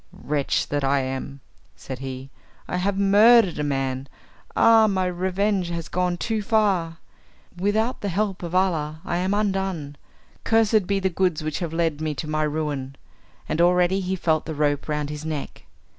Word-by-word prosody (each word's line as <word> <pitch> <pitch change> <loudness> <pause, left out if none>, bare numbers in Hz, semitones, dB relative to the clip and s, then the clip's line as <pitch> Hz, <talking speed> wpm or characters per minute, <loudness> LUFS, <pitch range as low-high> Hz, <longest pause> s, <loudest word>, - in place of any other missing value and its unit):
"Wretch 145 -2 -1
that 145 -1 -1
I 135 0 +2
am," 135 +1 -5 0.3
said 130 -2 -8
he, 135 0 -7 0.4
"I - - -2
have 195 +2 0
murdered 205 -1 +5
a - - 0
man. 135 -2 -2 0.5
Ah, 225 -1 +6
my 190 -2 0
revenge 185 +1 0
has 170 -1 -4
gone 180 -1 -1
too 220 +3 -2
far. 200 -7 +1 0.6
Without 210 +6 0
the 205 - -2
help 195 +1 -1
of 175 0 -5
Allah 160 -5 0
I 175 - -1
am 185 +3 0
undone! 190 -8 -2 0.5
Cursed 220 -3 +3
be 200 -1 +1
the 190 0 0
goods 175 -3 0
which 155 -1 -3
have 170 -4 -3
led 165 -2 -1
me 155 -1 -2
to 155 - -5
my 155 0 -1
ruin." 145 -3 -2 0.5
And 160 - 0
already 180 +2 +3
he 190 0 -2
felt 160 -3 0
the 160 - -4
rope 145 0 0
round 150 -1 -2
his 150 0 -6
neck. 155 -3 -5
175 Hz, 175 wpm, -24 LUFS, 150-195 Hz, 0.6 s, Ah